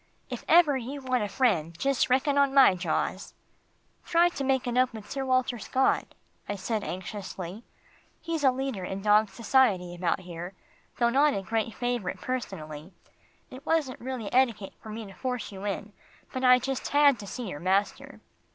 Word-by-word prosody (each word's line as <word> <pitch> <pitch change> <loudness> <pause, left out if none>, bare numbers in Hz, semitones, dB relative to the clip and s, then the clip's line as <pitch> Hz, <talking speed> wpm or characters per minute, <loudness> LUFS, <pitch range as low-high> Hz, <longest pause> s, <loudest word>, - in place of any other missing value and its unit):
"If - - -5
ever 325 -4 +6
you 260 +3 -6
want 255 -2 0
a - - -1
friend 175 - +1
just 275 +5 +1
reckon 270 +3 +2
on 280 -1 +3
my 270 -8 +8
jaws." 180 0 -2 0.7
"Try 345 +1 +3
to 280 - -5
make 265 -1 +1
it 245 -1 -2
up 255 0 +3
with 215 -2 -9
Sir 270 -1 -2
Walter 255 -2 +1
Scott," 260 +5 0 0.3
I 205 - -1
said 210 +2 -2
anxiously. 190 +1 -6 0.6
"He's 330 -3 -3
a 270 - +7
leader 260 -6 -3
in 190 +2 -5
dog 210 0 +4
society 205 -5 +2
about 175 +1 -1
here, 175 +1 -8 0.4
though 235 -1 +3
not 285 +4 +3
a 195 - -3
great 225 +2 -2
favourite 245 -6 -2
personally. 170 -10 -5 0.6
It 260 +2 -10
wasn't 305 -6 0
really 250 -4 -5
etiquette 235 -6 +2
for 220 - -10
me 220 +1 -6
to 195 - -11
force 250 +4 -4
you 195 0 -8
in, 205 +1 -4 0.4
but 260 - -3
I 250 0 +7
just 265 +1 -3
had 285 -3 +4
to 200 - -8
see 245 +3 -5
your 145 -6 -6
master." 190 +4 -1
235 Hz, 180 wpm, -28 LUFS, 195-265 Hz, 0.7 s, my